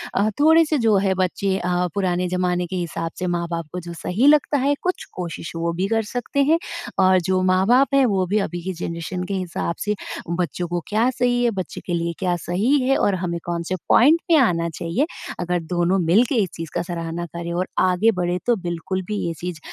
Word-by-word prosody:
अ, 205 +2 +3
थोड़े-से 315 0 +5
जो 215 - +5
हैं 190 -1 +1
बच्चे 190 +1 0
अ, 180 -1 0
पुराने 180 -2 0
ज़माने 180 0 0
के 185 - -5
हिसाब 165 -2 -3
से 180 - -2
माँ-बाप 170 -2 -2
को 180 - -3
जो 170 0 -8
सही 190 +9 0
लगता 295 0 +4
है 280 +2 +2
कुछ 365 0 -2
कोशिश 170 -2 -5
वो 170 0 -1
भी 185 +3 -1
कर 225 0 +1
सकते 250 +3 0
हैं। 330 - +4 0.4
और 185 0 +5
जो 185 0 +2
माँ-बाप 245 +10 +3
हैं 275 -1 +5
वो 195 -5 +1
भी 210 +4 +1
अभी 175 0 -6
की 190 +1 -3
ज़नरेशन 170 +1 -4
के 195 - -4
हिसाब 180 -2 -2
से 210 0 0 0.4
बच्चों 175 0 -2
को 175 - 0
क्या 220 +4 +2
सही 245 -1 +1
है, 240 - +4
बच्चे 190 -4 -5
के 175 - -3
लिए 170 0 -1
क्या 180 -2 +1
सही 200 - +1
है 265 +2 +2
और 200 - +2
हमें 175 -2 -3
कौन-से 170 +1 -2
पॉइंट 300 +7 +6
पे 335 - +5
आना 170 -9 +2
चाहिए, 170 - 0 0.3
अगर 175 0 0
दोनों 175 +2 +2
मिलके 210 - +3
इस 185 - -4
चीज़ 165 -1 -6
का 175 - +1
सराहना 170 0 -4
करें 170 0 -4
और 180 +2 -1 0.2
आगे 190 +5 +3
बढ़ें 175 0 0
तो 240 - +3
बिल्कुल 175 +2 -3
भी 210 - -2
ये 165 - -2
चीज़ 175 -2 -5
185 Hz, 215 wpm, -22 LUFS, 175-220 Hz, 0.4 s, पॉइंट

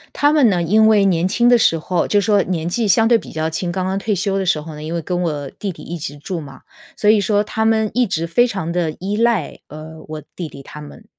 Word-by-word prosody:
他 290 +1 +3
们 275 -7 +5
呢， 180 -3 +1
因 220 +6 +4
为 210 -2 +4
年 180 -1 +2
轻 240 +4 +2
的 245 - +6
时 165 -7 +3
候 175 +2 -1
就 205 - +2
说 205 0 +3
年 170 -3 -3
纪 215 +5 -1
相 225 +3 +4
对 235 0 +5
比 - - -10
较 160 0 -2
轻， 175 +2 -3
刚 185 0 -2
刚 190 +1 -1
退 210 0 -1
休 195 +1 -1
的 190 - -2
时 160 -4 +1
候 160 +1 -9
呢， 150 - -9
因 160 - -5
为 170 - -2
跟 180 +2 -3
我 145 -5 -3
弟 200 -2 -5
弟 - - -12
一 175 - -6
直 145 -2 -7
住 170 +4 -5
嘛， 140 -3 -11 0.4
所 210 -1 +2
以 215 -1 +5
说 205 +1 +1
他 220 +1 -2
们 220 -1 +2
一 250 +1 +2
直 165 -2 -2
非 240 +9 +3
常 190 -7 -4
地 170 -2 -1
依 200 +3 -3
赖， 230 -7 0
呃， 155 +1 -10
我 155 -1 -7
弟 175 - -5
弟 140 -2 -12
他 150 - -11
们。 150 +9 -13
185 Hz, 295 characters per minute, -19 LUFS, 160-215 Hz, 0.4 s, 的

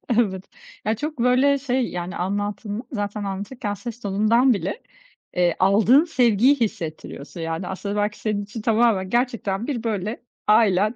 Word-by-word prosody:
Evet. 190 -5 +1 0.4
Ya, 220 +1 +1
çok 300 +2 -5
böyle 255 +4 +4
şey, 260 -2 0
yani 180 +1 -5
anlattığında, 205 +3 -3
zaten 205 -3 -3
anlatırken 205 +3 -4
ses 235 +3 -7
tonundan 220 +5 +3
bile, 225 - -3 0.5
eee, 175 -2 +2
aldığın 215 +9 +5
sevgiyi 250 - +4
hissettiriyorsun. 165 - -4
Yani, 165 +2 -3
aslında 200 +2 -4
belki 210 0 -1
senin 210 -2 -1
için 205 +3 -7
tamamen 220 -4 +2
gerçekten 235 -3 -1
bir 250 -6 -3
böyle 215 -1 -2 0.3
ailen, 210 0 +4
210 Hz, 140 wpm, -23 LUFS, 195-240 Hz, 0.5 s, aldığın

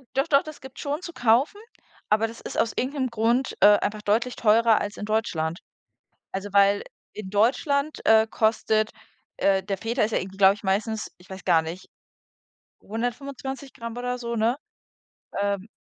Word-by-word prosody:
Doch, 270 - +1
doch, 280 -1 +4
das 310 -1 -10
gibt's 265 0 -11
schon 290 +4 -3
zu 345 - -7
kaufen, 255 - +2 0.5
aber 215 +1 +3
das 230 +1 -10
ist - - -5
aus 230 - +1
irgend 260 +3 -1
'nem 265 -3 -1
Grund, 235 +3 0
äh, 205 0 +8
einfach 210 0 -3
deutlich 235 +4 +1
teurer 225 0 +4
als 205 0 -5
in - - -5
Deutschland. 175 -7 -1 0.7
Also, 195 +1 -5
weil 200 0 +4 0.3
in 205 -3 -8
Deutschland, 280 +8 +1
äh, 220 0 +6
kostet, 220 -1 +1 0.4
äh 195 -1 +2
der 195 0 -3
Feta 230 +4 -1
ist 215 - 0
ja - - +1
irgendwie, 190 +1 -8
glaube 195 0 +6
ich, 210 - -16
meistens 210 +3 -1
ich 180 +2 -20
weiß 190 -1 -9
gar 170 -3 +4
nicht, 165 +3 -8 0.9
125g 245 +1 -5
oder 250 0 -3
so, 235 -1 -4
ne? 230 +2 +1 0.9
Ähm, 200 0 -1
220 Hz, 170 wpm, -25 LUFS, 205-250 Hz, 0.9 s, äh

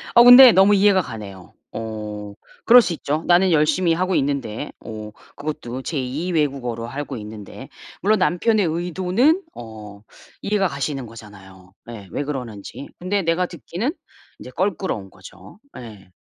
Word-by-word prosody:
어 235 - +9
근데 245 0 +10
너무 195 +1 +5
이해가 195 -1 +4
가네요. 100 - -10 0.2
어 105 -2 -6 0.3
그럴 245 +1 +8
수 175 - -2
있죠. 155 0 -3
나는 180 +1 +4
열심히 165 +3 +2
하고 185 +1 -1
있는데 140 -2 -2
어 110 -1 -8 0.2
그것도 135 -4 -6
제 155 - -4
2 145 +8 -3
외국어로 135 -7 -2
하고 140 0 -6
있는데 105 -1 -10 0.3
물론 210 +1 +2
남편의 195 +3 +2
의도는 185 - +1
어 105 -3 -11 0.4
이해가 200 -2 0
가시는 140 -3 -4
거잖아요. 95 -4 -14 0.2
예 105 -5 -9
왜 145 - -3
그러는지. 125 -3 -7
근데 195 +3 -1
내가 165 +2 +1
듣기는 190 - -4 0.5
이제 125 - -10
껄끄러운 185 - -2
거죠. 95 - -15 0.2
예. 105 -6 -12
145 Hz, 305 characters per minute, -21 LUFS, 110-185 Hz, 0.5 s, 근데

